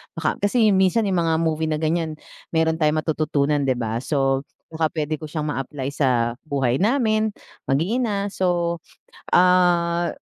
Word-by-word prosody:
Baka 160 -1 -2
kasi 215 +1 +3
minsan 190 +3 +3
yung 190 -3 0
mga 160 - +2
movie 160 -1 0
na 155 - 0
ganyan, 160 0 -1 0.3
meron 160 0 0
tayong 155 0 +1
matututunan 150 -2 0
'di 130 - +2
ba? 115 -1 -2
So, 135 0 0 0.2
baka 160 0 0
pwede 155 -1 -2
ko 155 - -7
siyang 150 -1 -3
ma-apply 135 -1 -4
sa 125 -5 +1 0.2
buhay 135 -3 0
namin, 220 -1 +2 0.4
mag-iina. 200 - 0
So 175 -3 0 0.5
ah, 175 -1 +3
160 Hz, 145 wpm, -22 LUFS, 145-180 Hz, 0.5 s, kasi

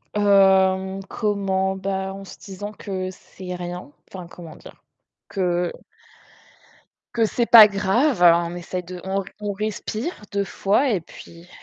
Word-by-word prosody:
hem, 190 -1 +3
comment? 195 -3 -1
Bah, 190 0 -3
en 195 0 -9
se 195 - -12
disant 205 +1 -8
que 190 -3 -5
c'est 185 0 -10
rien, 175 -3 -7 0.2
enfin, 180 -2 -9
comment 170 -2 -12
dire? - - -15 0.5
Que 180 -2 -1 1.4
que 230 -1 +3
c'est 235 +2 -1
pas 220 -3 +10
grave. 205 +3 +1 0.2
On 170 +1 -6
essaie 180 +1 -5
de 180 0 -9
on 190 +1 -1
r - - -7
on 205 -1 -3
respire 215 - -4
2 200 0 0
fois 205 +7 +1
et 200 -6 0
puis 170 +1 -14
190 Hz, 145 wpm, -22 LUFS, 180-205 Hz, 1.4 s, pas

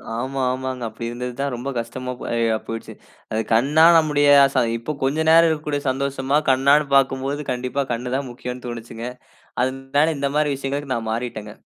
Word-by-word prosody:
ஆமா, 130 +3 -3
ஆமாங்க. 130 -1 -4
அப்படி 115 - -7
இருந்தது 125 +1 -5
தான் 140 -1 -1
ரொம்ப 125 +3 -5
கஷ்டமா 125 +2 -5 0.4
ஆ - - +1
போய்டுச்சு. 115 0 -6 0.6
கண்ணா 145 +8 +4
நம்முடைய 150 -2 +2 0.3
ச - - -20 0.2
இப்போ 115 +6 -5
கொஞ்சம் 155 +4 0
நேரம் 165 +1 +7
இருக்கக்கூடிய 150 -2 -2
சந்தோஷமா 135 +1 0
கண்ணானு 140 +3 +4
பார்க்கும்போது, 135 +1 +1
கண்டிப்பா 125 +2 -2
கண் 125 +2 -4
தான் 140 -1 -4
முக்கியம்னு 125 +1 -7
தோனுச்சுங்க. 115 -1 -7 0.6
அதனால 135 +4 0
இந்த 140 0 0
மாதிரி 150 -1 +2
விஷயங்களுக்கு 140 0 -3
நான் 115 -1 -4
மாறிட்டேங்க. 110 -2 -4
135 Hz, 155 wpm, -22 LUFS, 125-145 Hz, 0.6 s, நேரம்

